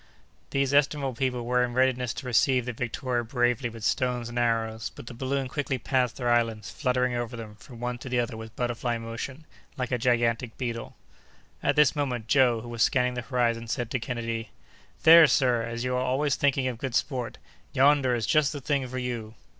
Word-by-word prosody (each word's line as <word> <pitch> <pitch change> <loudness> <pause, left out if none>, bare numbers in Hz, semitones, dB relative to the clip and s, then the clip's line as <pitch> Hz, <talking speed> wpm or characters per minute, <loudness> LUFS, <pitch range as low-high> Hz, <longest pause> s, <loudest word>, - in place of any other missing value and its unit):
These 140 0 0
estimable 140 -1 +2
people 125 -1 -2
were 125 +1 +2
in 120 -1 -3
readiness 130 -2 +2
to 135 - -7
receive 125 +1 +2
the 125 - -3
Victoria 120 +1 -2
bravely 120 0 0
with 115 -1 -10
stones 125 -1 0
and 120 0 -3
arrows, 115 -2 0
but - - -10
the 120 - -8
balloon 135 +2 -2
quickly 135 0 -2
passed 125 0 0
their 120 -2 0
islands, 115 -3 0
fluttering 125 -2 0
over 120 -1 -3
them, 110 -2 -8
from 120 0 -13
one 120 0 -3
to 130 - -8
the 125 -1 +1
other 120 -1 -2
with 110 +1 -9
butterfly 120 -1 -1
motion, 115 +6 -6 0.3
like 125 -2 -3
a 125 - 0
gigantic 120 -1 +1
beetle. 115 -2 -4 0.7
At - - +1
this 150 0 +4
moment, 125 -6 -2
Joe, 125 -3 +4
who 120 - -9
was 120 -1 -4
scanning 125 +1 +3
the 125 - -3
horizon, 115 -2 0
said 120 +1 -3
to 125 - 0
Kennedy: 115 -2 -4 0.5
"There, 165 0 +9
sir, 125 -4 +3
as 115 +1 -4
you 125 0 -1
are 125 - +1
always 135 +3 +1
thinking 135 -2 +1
of 120 -3 -4
good 130 -2 -3
sport, 125 -5 -1 0.3
yonder 135 -2 +4
is 115 -2 -1
just 150 -2 +3
the 145 - -5
thing 140 -1 -1
for 130 +1 -6
you!" 120 -3 -4
125 Hz, 200 wpm, -27 LUFS, 115-130 Hz, 0.7 s, There